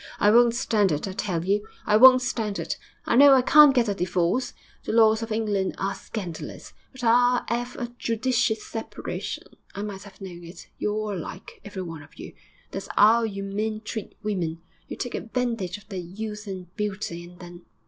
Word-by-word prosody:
I 205 - +5
won't 235 +1 +5
stand 215 -7 +2
it, 150 +5 -1
I - - -4
tell 180 -3 -2
you; 205 +2 0 0.2
I 210 - +3
won't 255 +2 +8
stand 220 -5 -2
it. - - -3 0.3
I - - +1
know 275 +1 +8
I 255 - +4
can't 295 0 +7
get 240 -2 +3
a 205 - +1
divorce 180 +5 0 0.3
the - - -3
laws 220 -1 +5
of 225 0 -5
England 210 -3 0
are 195 +1 -1
scandalous 190 -4 -7 0.2
but 260 -2 -11
I'll 245 +1 +4
'ave 245 +1 -2
a 240 - -3
judicious 230 -2 0
separation.... 225 -1 -5 0.3
I 200 - -4
might 200 -2 -6
have 200 -1 -14
known 175 -3 -9
it, 170 +2 -11
you're 210 - 0
all 215 -1 -2
alike, 185 +2 -8
every 205 -2 -6
one 165 -3 -7
of 145 - -17
you; - - -9 0.4
that's - - -6
'ow 220 +3 +6
you 200 -2 -4
men 215 +2 -3
treat 220 -1 -6
women. 170 -6 -2 0.2
You - - -7
take 245 - -4
advantage 230 -6 -2
of 205 -1 -18
their 195 -3 -5
youth 210 +4 -7
and 185 -2 -8
beauty, 200 -5 -3
and 175 +1 -13
then.... 175 -1 -11
210 Hz, 195 wpm, -25 LUFS, 190-230 Hz, 0.4 s, won't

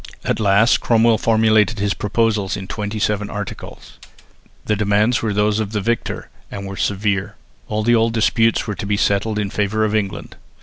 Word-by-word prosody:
At - - 0
last 105 +2 +4
Cromwell 115 -1 +3
formulated 110 -2 +3
his 100 0 0
proposals 105 -2 0
in 95 - -6
twenty 105 +1 -4
seven 105 -1 -1
articles. 105 -2 -8 0.7
The 105 - +1
demands 105 +3 +1
were 110 - -1
those 105 +1 +1
of 110 -1 -3
the 105 - 0
victor, 115 +3 -3 0.2
and 100 -1 -7
were 95 0 -6
severe. 100 0 -1 0.3
All 110 0 -2
the 120 +2 +3
old 115 0 +3
disputes 115 0 +2
were 105 - -3
to 100 - -6
be 105 0 0
settled 100 +2 0
in 100 -2 -2
favour 105 +1 0
of 105 - -2
England. 105 -3 -3
105 Hz, 180 wpm, -19 LUFS, 100-110 Hz, 0.7 s, last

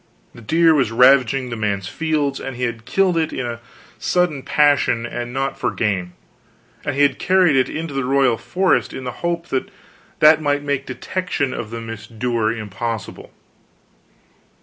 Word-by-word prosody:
The 115 - -13
deer 165 +8 +4
was 135 -7 +1
ravaging 125 +1 +4
the - - -2
man's 100 -3 -2
fields, 150 +2 -1
and 135 -1 -6
he 125 - -5
had 115 -2 -3
killed 190 +1 +2
it 160 -1 0
in 120 -3 -4 0.4
sudden 175 -6 0
passion, 140 -5 +2
and 120 0 -5
not 135 +1 -2
for - - 0
gain; 95 -5 -2 0.7
and 145 - -2
he 145 - +3
had 140 -1 +2
carried 180 -5 +3
it 130 -1 +2
into 160 -1 -5
the 135 -1 -1
royal 130 -3 +2
forest 185 0 +1
in 130 - -6
the 125 - -4
hope 170 0 -2
that 130 - -2 0.5
that 155 +1 +6
might 145 -1 0
make 140 -1 -2
detection 140 0 -3
of 110 - -5
the 115 0 -6
misdoer 115 0 -2
impossible. 110 0 -5
135 Hz, 165 wpm, -20 LUFS, 115-150 Hz, 0.7 s, that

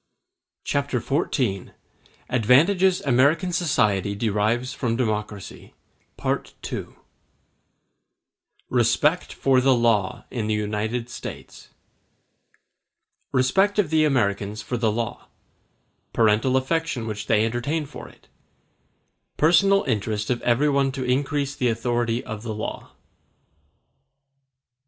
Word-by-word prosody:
Chapter 140 -3 -1
XIV: 125 - -1 0.5
Advantages 165 - +3
American 145 +7 +2
Society 105 - +1
Derive 110 +3 0
From 120 -4 -2
Democracy—Part 105 -4 -5 0.2
II - - -4 1.8
Respect 130 +8 +2
For 130 -2 +2
The 130 0 +4
Law 115 -2 +1
In 115 -4 -3
The 110 - +1
United 105 +3 -2
States - - -9 1.6
Respect 190 +12 +2
of 185 -7 +1
the 160 -1 +4
Americans 105 -6 0
for 125 - -3
the 115 -2 +1
law—Parental 115 +1 -2
affection 130 -3 -1
which 110 -2 -5
they 110 -1 +3
entertain 120 +7 -2
for - - -10 1.3
it—Personal 195 +5 +4
interest 105 -2 -2
of 120 - -1
everyone 140 +2 +2
to 130 -1 -4
increase 140 +2 0
the 125 - 0
authority 120 0 -1
of 110 -1 -6
the 110 -2 -5
law. 105 - -6
120 Hz, 95 wpm, -24 LUFS, 110-140 Hz, 1.8 s, The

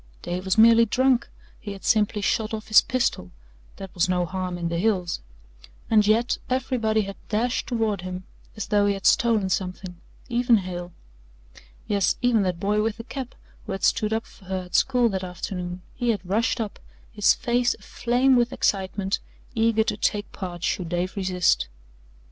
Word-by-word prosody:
Dave 180 +2 -4
was 190 +2 0
merely 230 +1 +7
drunk, 260 +2 +2 0.3
he 205 - -6
had 195 - -12
simply 210 -1 +2
shot 220 +2 0
off 215 0 -9
his 215 - +8
pistol 240 - -1 0.5
that 195 -2 -9
was 180 0 +1
no 180 -1 +1
harm 185 0 -4
in 170 -1 -2
the 170 0 -2
hills. 185 -4 0 0.7
And 210 -2 +5
yet 230 +3 +2
everybody 245 -4 +1
had 195 -1 -6
dashed 235 +3 0
toward 225 -5 -1
him 185 0 -6 0.3
as 215 - -3
though 205 -1 +2
he 200 - +1
had 195 - -9
stolen 225 -5 +3
something 185 -1 -3 0.3
even 240 -1 +3
Hale. 180 -2 -5 1.0
Yes, 200 -3 +2
even 245 -3 +3
that 180 -3 -1
boy 210 +2 +1
with 220 0 -1
the 230 - -7
cap 260 0 -7 0.3
who - - -3
had 195 - -6
stood 215 0 +2
up 225 +1 -1
for 190 - -18
her 185 0 -3
at 180 - -15
school 250 -3 +3
that 190 -2 -3
afternoon 180 0 -5
he 245 -1 -2
had 205 -5 -1
rushed 225 +6 +1
up, 215 -3 -4 0.3
his 210 -2 +3
face 245 0 +1
aflame 250 +2 +1
with 240 -1 +2
excitement, 195 0 0 0.3
eager 225 -1 +2
to 210 - -2
take 205 0 -1
part 175 -2 -7
should 175 -3 -1
Dave 175 +3 -2
resist. 180 - +1
205 Hz, 175 wpm, -24 LUFS, 185-230 Hz, 1.0 s, his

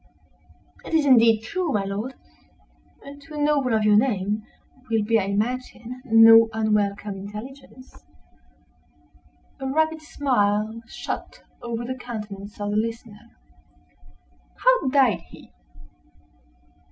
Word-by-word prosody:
"It - - -3
is 310 -2 +3
indeed 230 -4 +5
true, 345 +7 -2
my 205 -5 0
lord; 210 +7 -4 0.9
and, 285 +1 -11
to 305 +2 -12
a - - -6
noble 290 -5 +1
of 215 - +1
your 210 -1 +5
name, 210 -3 0 0.5
will 225 -2 +1
be, 225 +2 +2
I 195 - -1
imagine, 240 +4 -3
no 225 -1 +7
unwelcome 210 -2 -1
intelligence." 255 +6 -11 1.6
A 270 - -4
rapid 315 +3 0
smile 220 -7 0
shot - - -7 0.2
over 235 0 -4
the 255 - -3
countenance 210 -5 -8
of 205 0 -3
the 210 - 0
listener. 230 0 -5 1.3
"How - - +2
died 255 -10 +3
he?" - - -16
225 Hz, 115 wpm, -23 LUFS, 210-265 Hz, 1.6 s, no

